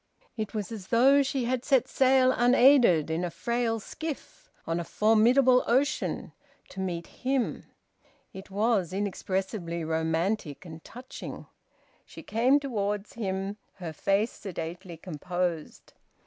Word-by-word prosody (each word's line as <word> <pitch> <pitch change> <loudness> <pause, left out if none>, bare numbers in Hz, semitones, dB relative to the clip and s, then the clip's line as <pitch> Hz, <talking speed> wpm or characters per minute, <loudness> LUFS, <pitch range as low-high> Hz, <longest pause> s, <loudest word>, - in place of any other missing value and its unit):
It 215 -1 -5
was 210 +1 -3
as 205 -4 -7
though 270 +4 +5
she 270 -2 -1
had 250 0 -1
set 265 -2 +3
sail 260 -1 +4
unaided, 245 - +5
in 165 +2 -1
a 175 - -1
frail 225 +6 -1
skiff, 315 +7 -7 0.2
on 165 +1 -1
a - - -2
formidable 240 +7 +4
ocean, 275 +5 0 0.4
to - - -9
meet 175 -3 -3
him. 260 -1 -2 0.7
It 190 +1 -10
was 200 -3 +1
inexpressibly 190 -3 -3
romantic 160 +1 -1
and 160 -1 -10
touching. 250 +2 -9 0.6
She - - -12
came 250 +6 +3
towards 210 -6 -3
him, 195 -2 -3 0.2
her 170 -4 -7
face 200 +8 +1
sedately 175 -1 -7
composed. 175 0 -4
205 Hz, 125 wpm, -28 LUFS, 175-245 Hz, 0.7 s, though